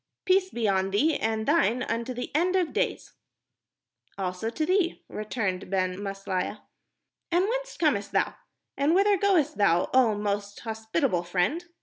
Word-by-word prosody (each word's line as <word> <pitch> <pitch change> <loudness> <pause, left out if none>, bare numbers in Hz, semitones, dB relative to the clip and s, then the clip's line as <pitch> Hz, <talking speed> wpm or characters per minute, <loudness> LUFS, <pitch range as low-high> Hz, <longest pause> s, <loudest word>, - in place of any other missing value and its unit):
Peace 375 0 +3
be 235 - -1
on 190 -1 +1
thee 290 +11 +2
and 220 0 -1
thine 255 -6 +2
unto 235 +1 -2
the 245 0 -5
end 360 +4 +2
of 360 -4 +1
days." - - -2 1.0
"Also 185 +3 -2
to 310 +7 -2
thee," 365 0 +1
returned 205 -4 -3
Ben 185 -1 0
Maslia. 195 0 -3 0.7
"And 350 +2 +3
whence - - -3
comest 280 -12 +1
thou? - - +1 0.4
And 295 +4 +2
whither 400 +2 +4
goest 345 - +2
thou, 175 -3 +3
oh 245 -5 +4
most 205 0 -3
hospitable 220 - -1
friend?" 180 - -1
230 Hz, 145 wpm, -27 LUFS, 200-335 Hz, 1.0 s, whither